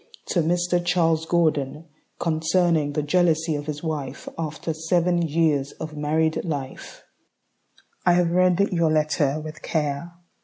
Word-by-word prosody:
To 180 - +1
Mr. 175 +2 +1
Charles 165 -2 +1
Gordon 155 -3 0 0.3
Concerning 160 -2 +1
the 150 - -1
Jealousy 165 0 +2
of 145 0 -5
His 150 0 -5
Wife 145 -5 -4
After 160 0 -4
Seven 170 +2 +1
Years 155 -3 +1
of 155 -1 -7
Married 155 +2 0
Life 140 -6 -6 1.0
I 175 - +4
have 175 -1 +2
read 180 0 +3
your 170 -3 +2
letter 155 -1 +1
with 155 0 -8
care. 150 +1 -2
160 Hz, 130 wpm, -24 LUFS, 150-170 Hz, 1.0 s, I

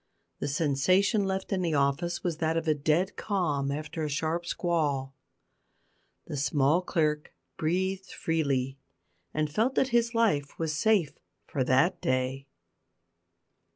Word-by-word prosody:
The - - -2
sensation 175 +8 +2
left 190 +1 -2
in 190 - 0
the 165 -3 0
office 145 +5 0
was 170 -3 -1
that 160 0 0
of 165 0 -2
a 155 - +4
dead 155 +6 +1
calm 155 -10 -1
after 155 +2 -4
a 150 - -1
sharp 160 +4 -1
squall. 145 -7 -1 1.1
The 145 - -5
small 145 +4 +2
clerk 150 -4 -1 0.2
breathed 190 +4 -1
freely, 135 -5 -1 0.5
and 155 0 0
felt 235 +8 +1
that 265 - +2
his 235 -1 +1
life 150 -12 +1
was 160 -2 -1
safe 195 -2 +2 0.3
for 135 - -1
that 145 +9 +3
day. 130 +1 -1
160 Hz, 135 wpm, -28 LUFS, 140-185 Hz, 1.1 s, a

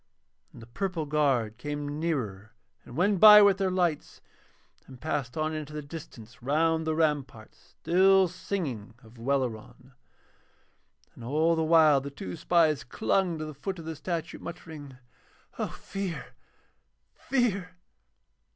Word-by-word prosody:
And 115 - -13
the - - -10
purple 165 - -3
guard 135 -7 0
came 145 +2 -4
nearer 115 - -3 0.3
and 120 - -11
went 190 +2 +2
by 210 0 +10
with 200 -1 +4
their 190 -1 +1
lights, 175 -5 -1 0.7
and 130 -2 -13
passed 145 -4 -3
on 155 0 -1
into 150 -1 -6
the 150 0 -5
distance 125 -7 -11
round 160 +4 +1
the 160 - 0
ramparts 145 -8 -3
still 190 +2 +4
singing 155 - -5
of 115 +1 -17
Welleran. 130 0 -3 1.2
And 120 - -13
all 155 +7 +2
the 160 - 0
while 155 -3 +5
the 140 - -6
two 95 -10 -7
spies 160 -4 +2
clung 185 - 0
to 155 - -5
the 155 - -7
foot 190 +7 -5
of 165 - -9
the 160 0 -5
statue, 165 +1 -4
muttering: 150 -6 -9 0.6
'O - - 0
Fear, 195 -3 -6 0.8
Fear.' 200 -9 -1
155 Hz, 140 wpm, -28 LUFS, 135-175 Hz, 1.2 s, by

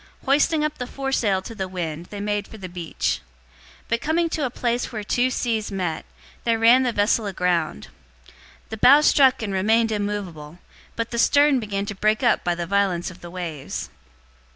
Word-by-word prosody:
Hoisting 300 +3 +3
up 305 - -4
the 250 - -4
foresail 240 -9 -1
to 230 - -8
the 190 -4 -4
wind, 170 -2 -5
they 205 - -8
made 205 0 -2
for 220 - -11
the 190 -3 -7
beach. 175 - -3 0.6
027:041 - - -32
But 230 +1 0
coming 335 +2 +1
to 310 -3 -1
a - - -1
place 240 0 -2
where 215 -3 -5
two 245 +4 +1
seas 225 -4 -2
met, 180 -5 -3 0.4
they 230 -1 +2
ran 230 +3 +6
the 250 -2 +1
vessel 210 0 +1
aground. 180 - -1 0.8
The 220 - -6
bow 275 +7 +7
struck 265 -5 +4
and 200 -2 -3
remained 220 +4 +2
immovable, 195 -7 -4 0.4
but 230 -1 -3
the 235 - -2
stern 285 +1 +4
began 200 -3 -3
to 205 - -5
break 215 +4 +1
up 240 - +3
by 175 -1 0
the 170 0 -3
violence 190 -2 0
of 180 - -15
the 175 - -9
waves. 170 -6 -6
210 Hz, 190 wpm, -23 LUFS, 185-245 Hz, 0.8 s, bow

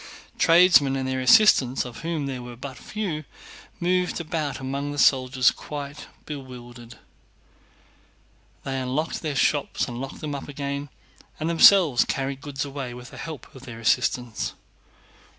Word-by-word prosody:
Tradesmen 165 -5 +6
and 130 -1 -2
their 130 0 -1
assistants 130 - +5
(of 120 -2 -9
whom 165 -3 -3
there 130 -2 -4
were 120 0 -9
but 130 +2 -8
few) 185 -8 -4 0.6
moved 180 0 0
about 155 -3 -3
among 140 +2 -3
the 145 - -6
soldiers 130 -2 +4
quite 145 0 -8 0.2
bewildered. 120 -5 -9 1.7
They 135 -1 -3
unlocked 135 +6 -2
their 155 -3 -3
shops 145 +1 +1
and 120 0 -6
locked 135 - -7
them 150 -2 -5
up 140 - -6
again, 140 0 -4 0.5
and 155 - -2
themselves 170 -5 +6
carried 135 0 -3
goods 145 -2 -4
away 135 -3 -6
with 125 0 -11
the - - -11
help 155 -7 -8
of 130 - -12
their 115 -2 -9
assistants. 115 0 0
140 Hz, 145 wpm, -24 LUFS, 130-155 Hz, 1.7 s, Tradesmen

